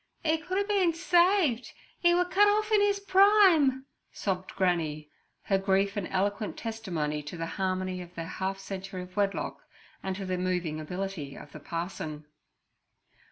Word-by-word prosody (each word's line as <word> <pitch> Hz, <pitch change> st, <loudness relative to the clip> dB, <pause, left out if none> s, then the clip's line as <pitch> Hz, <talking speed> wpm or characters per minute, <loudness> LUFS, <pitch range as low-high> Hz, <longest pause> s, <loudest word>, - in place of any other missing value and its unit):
"E 320 Hz, 0 st, +3 dB
could 370 Hz, +4 st, -3 dB
a 400 Hz, 0 st, 0 dB
bin 380 Hz, -6 st, +2 dB
saved! 345 Hz, -, +3 dB, 0.3 s
'E 345 Hz, 0 st, +5 dB
were 360 Hz, 0 st, +3 dB
cut 395 Hz, +3 st, +4 dB
off 425 Hz, +1 st, +2 dB
in 425 Hz, -1 st, +5 dB
his 405 Hz, 0 st, +2 dB
prime!' 375 Hz, -9 st, +5 dB, 0.3 s
sobbed 190 Hz, -2 st, -3 dB
Granny, 160 Hz, -5 st, 0 dB, 0.3 s
her 195 Hz, -1 st, +1 dB
grief 195 Hz, +1 st, +1 dB
an 205 Hz, -3 st, -2 dB
eloquent 200 Hz, +3 st, -1 dB
testimony 175 Hz, -10 st, -3 dB
to 150 Hz, +4 st, -8 dB
the 165 Hz, -, -3 dB
harmony 185 Hz, +1 st, -2 dB
of 175 Hz, 0 st, -12 dB
their 165 Hz, -, -4 dB
half 190 Hz, +3 st, -3 dB
century 195 Hz, -1 st, -6 dB
of 180 Hz, 0 st, -14 dB
wedlock 200 Hz, -1 st, -1 dB, 0.4 s
and 190 Hz, -1 st, -3 dB
to 195 Hz, 0 st, -5 dB
the 185 Hz, -1 st, -2 dB
moving 180 Hz, -4 st, -1 dB
ability 180 Hz, -3 st, -5 dB
of 145 Hz, -, -11 dB
the 155 Hz, -, -9 dB
parson. 160 Hz, -2 st, -5 dB
195 Hz, 160 wpm, -29 LUFS, -, 0.4 s, E